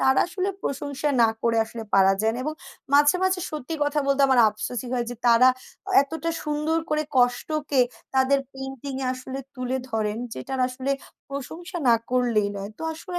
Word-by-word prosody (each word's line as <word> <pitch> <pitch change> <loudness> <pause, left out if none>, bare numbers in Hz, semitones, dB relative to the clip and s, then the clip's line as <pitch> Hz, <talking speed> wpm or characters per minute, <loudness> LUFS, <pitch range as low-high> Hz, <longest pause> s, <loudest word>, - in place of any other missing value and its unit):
তার 265 0 +4
আসলে 370 +2 -2
প্রশংসা 280 +1 -2
না 225 - +6
করে 230 -1 +2
আসলে 225 +1 -8
পারা 195 0 +6
যায় 220 +1 +1
এবং 305 +1 -2 0.4
মাঝে, 290 +4 +6
মাঝে, 375 -1 +2
সত্যি 305 +1 -5
কথা 290 +1 0
বলতে 275 0 +3
আমার 260 -2 +5
আফসোসই 220 +4 -5
হয় 240 -1 0
যে, 245 - -4
তারা 235 +2 +7 0.5
এতটা 320 +3 -3
সুন্দর 300 +2 0
করে 305 0 +2
কষ্টকে 265 +3 +2 0.3
তাদের 265 +1 +4
পেইন্টিং 270 0 -6
এ - - -1
আসলে 260 +1 -6 0.2
তুলে 255 0 -2
ধরেন 215 -1 -1
যে, - - -6
টার 265 -1 -2
আসলে 260 +2 -4 0.4
প্রশংসা 330 +7 -6
না 235 - +7 0.2
করলেই 240 -5 +2
নয়। 200 +1 -5
তো - - -8
আসলে 355 +2 -5
265 Hz, 175 wpm, -25 LUFS, 245-300 Hz, 0.5 s, তারা